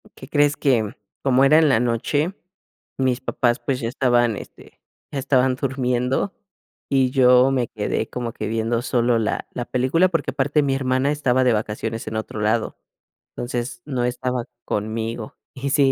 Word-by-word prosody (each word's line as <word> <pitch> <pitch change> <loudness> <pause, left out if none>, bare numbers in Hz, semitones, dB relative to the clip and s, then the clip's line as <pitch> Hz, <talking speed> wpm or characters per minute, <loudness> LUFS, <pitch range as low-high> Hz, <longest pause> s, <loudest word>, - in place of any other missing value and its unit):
¿Qué 130 - -11
crees? 145 0 +2
Que 115 -7 +1 0.3
cómo 135 0 +4
era 150 +3 +6
en 155 - +4
la 125 -5 +4
noche, 145 +8 0 0.6
mis 130 -2 0
papás, 120 0 0
pues, 130 -2 0
ya 115 -2 -2
estaban 120 -3 +2
este, - - -13 0.3
estaban 130 -2 +2
durmiendo, 130 +4 -1 0.6
y 130 -2 +2
yo 125 0 +5
me 125 -3 0
quedé 110 +1 -2
como 120 -2 -4
que 105 - -4
viendo 115 +2 0
solo 120 -2 +1
la 110 - -2
la 120 - -3
película, 135 +9 +2
porque 165 - -1
aparte 145 +2 +1
mi 135 -1 +1
hermana 130 +1 +1
estaba 130 -3 +2
de 125 -2 +4
vacaciones 110 +1 -3
en 110 - -4
otro 110 -1 -5
lado. 110 +2 0 0.6
Entonces 120 0 -4
no 130 -4 -2
estaba 125 0 -2 0.2
conmigo. 110 +1 -3 0.2
Y 135 +2 -3
si 140 -2 +4
125 Hz, 160 wpm, -22 LUFS, 115-135 Hz, 0.6 s, era